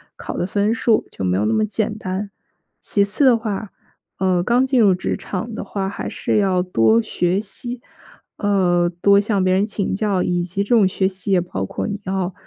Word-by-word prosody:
考 - - -6
的 - - 0
分 205 +3 +1
数， 230 -1 +2
就 95 - -5
没 90 0 +1
有 105 - +1
那 - - +1
么 215 0 +2
简 215 0 -2
单。 195 0 -4 0.5
其 200 - +1
次 205 +8 +1
的 250 -3 +6
话， 215 -2 -4 0.5
呃， 185 -2 +2
刚 240 +7 +2
进 260 -1 +2
入 200 -5 +5
职 185 - -3
场 220 +4 -5
的 - - -5
话， 195 -1 -3
还 - - -5
是 - - -1
要 190 -3 +2
多 115 -11 +3
学 180 - 0
习， 240 +4 -4 0.6
呃， 180 -4 +2
多 200 0 +6
向 205 -2 0
别 185 0 +2
人 195 +2 +2
请 205 -2 -2
教 200 -2 0
以 175 -1 0
及 185 +3 -2
这 200 - -11
种 210 -4 +5
学 190 0 0
习 190 +1 -4
也 190 - +4
包 130 - -4
括 - - -4
你 205 -1 -4
要， 190 -1 -2
195 Hz, 225 characters per minute, -20 LUFS, 180-210 Hz, 0.6 s, 的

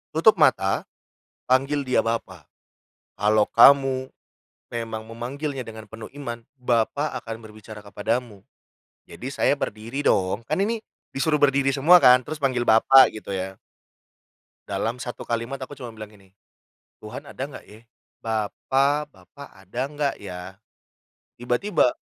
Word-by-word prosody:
Tutup - - +5
mata, - - +2 0.6
panggil 135 +2 +1
dia 125 -3 +2
Bapa, 105 -8 -4 0.7
kalau 105 0 +2
kamu 130 +1 +5 0.6
memang 115 -1 -5
memanggilnya 130 +3 -5
dengan 110 -2 -10
penuh 110 0 -9
iman. 120 -3 -6
Bapa 125 +3 0
akan 115 -1 -7
berbicara 110 -1 -11
kepadamu". 105 +1 -4 0.6
Jadi 130 +3 -7
saya 140 - +2
berdiri 115 +5 -4
dong, 100 +4 +1
kan 155 +6 -1
ini 225 +3 0 0.3
disuruh 150 +2 0
berdiri 135 -1 +3
semua 155 +7 +7
kan, 125 -6 +7
terus 155 +5 -6
panggil 130 -4 0
"Bapa", 120 +3 +6
gitu 105 -2 -7
ya. 95 0 -4 1.1
Dalam 120 +2 -2
1 120 -1 -6
kalimat, 115 +3 -3
aku 130 - -7
cuma 120 -4 -8
bilang 110 -1 -9
gini, 95 -2 -21 0.7
"Tuhan - - -8
ada - - -6
nggak, - - -11
ya? 110 +2 -15 0.4
Bapa, 135 +7 0
Bapa 140 -1 -15
ada 95 +5 -7
nggak, 145 -1 -1
ya?". 90 -1 -8 0.8
Tiba-tiba 125 - +1
120 Hz, 130 wpm, -24 LUFS, 110-135 Hz, 1.1 s, semua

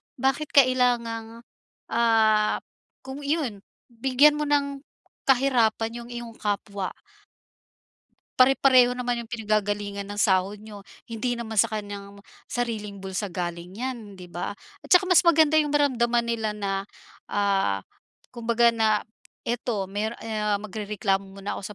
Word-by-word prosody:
bakit 270 +4 0
kailangang, 235 -3 +2 0.5
ah, 220 -2 +3 0.4
kung 265 +2 -7
iyon 280 -8 -1 0.3
bigyan 265 +5 +4
mo 300 - 0
ng 280 -1 0 0.5
kahirapan 235 -3 +2
yung - - -13
iyong 240 -1 -7
kapwa? 200 -2 -3 1.5
Pare-pareho 255 -1 +5
naman 245 -1 -2
'yung 235 - -7
pinanggagalingan 205 -3 -2
ng 205 - -6
sahod 195 -1 +2
niyo, 210 -2 -10 0.3
hindi 240 +2 -1
naman 225 -2 -3
sa - - +5
kanyang 200 -1 -7 0.2
sariling 220 -4 -3
bulsa 190 +2 -3
galing 175 0 -5
'yan 235 -4 -5
'di 180 -2 -12
ba. 175 +4 -4 0.2
At - - -15
tsaka 360 +1 +6
mas 365 -2 +5
maganda 315 -2 +5
'yung 300 - +1
maramdaman 240 -5 +2
nila 225 -2 -2
na, 195 -1 -3 0.4
ah, 195 - +1 0.5
kumbaga 235 0 +2
na 220 -2 +2 0.4
ito 235 -3 -2
mer 215 +3 -2
e 225 - -6
ah, 210 -1 +1
magrereklamo 205 -1 -2 0.2
muna 200 0 -5
ako - - -12
225 Hz, 130 wpm, -25 LUFS, 205-250 Hz, 1.5 s, tsaka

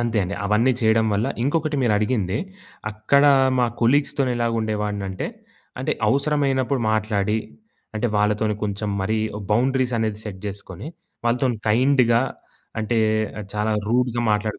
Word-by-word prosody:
అంతే 115 -2 0
అండి. 95 +2 -3
అవన్నీ 110 +6 +3
చేయడం 110 0 +3
వల్ల 105 +5 0 0.2
ఇంకొకటి 150 +2 0
మీరు 115 -3 +3
అడిగింది, 105 -3 0 0.5
అక్కడ 110 +7 +2 0.3
మా 120 - +4
కొలీగ్స్‌తో 140 +3 +2
ఎలాగా 115 -1 0
ఉండేవాడినంటే, 105 -3 -2 0.5
అంటే, - - 0 0.2
అవసరమైనప్పుడు 140 -2 +1
మాట్లాడి, 105 0 0 0.6
అంటే 120 - 0
వాళ్ళతోని 105 +1 +1
కొంచెం 105 +1 -3
మరి 110 +3 0 0.3
బౌండరీసనేది 120 -2 +1
సెట్ 95 -3 -7
జేసుకొని, 100 - -7 0.4
వాళ్ళతోని 120 -1 +1
కైండ్‌గా, 120 0 +4 0.6
అంటే 115 +1 0 0.6
చాలా 105 +1 0 0.2
రూడ్‌గా 120 0 +1
మాట్లాడు 105 0 -1
110 Hz, 120 wpm, -22 LUFS, 105-125 Hz, 0.6 s, మా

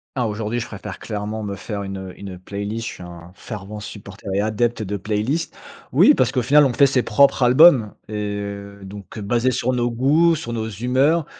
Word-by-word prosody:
Ah, 125 -3 0
aujourd'hui, 110 +2 -3
je 120 - -4
préfère 105 - -8
clairement 105 0 -4
me 100 -1 -4
faire 100 +1 -5
une 95 -1 -6
une 95 -2 -8
playlist. 100 +4 -5
Je - - -5
suis 90 - -11
un 85 0 -11
fervent 105 0 -8
supporter 100 -1 -10
et 100 - +2
adepte 110 +2 0
de 100 0 -3
playlists. 110 - -2 0.4
Oui, - - +7
parce - - +1
qu'au 125 - +1
final, 145 +5 +5
on 130 - 0
fait 140 - +5
ses 130 -2 +2
propres 135 +4 +3
albums, 125 -3 +6 0.2
et - - -7 0.3
heu, 100 0 -8
donc, 100 +2 -10
heu, - - -5
basés 120 +5 +1
sur 125 +1 0
nos 120 -1 0
goûts, 150 +8 +3
sur 120 -6 -6
nos 110 -1 -3
humeurs. 130 - +1
110 Hz, 205 wpm, -21 LUFS, 100-125 Hz, 0.4 s, Oui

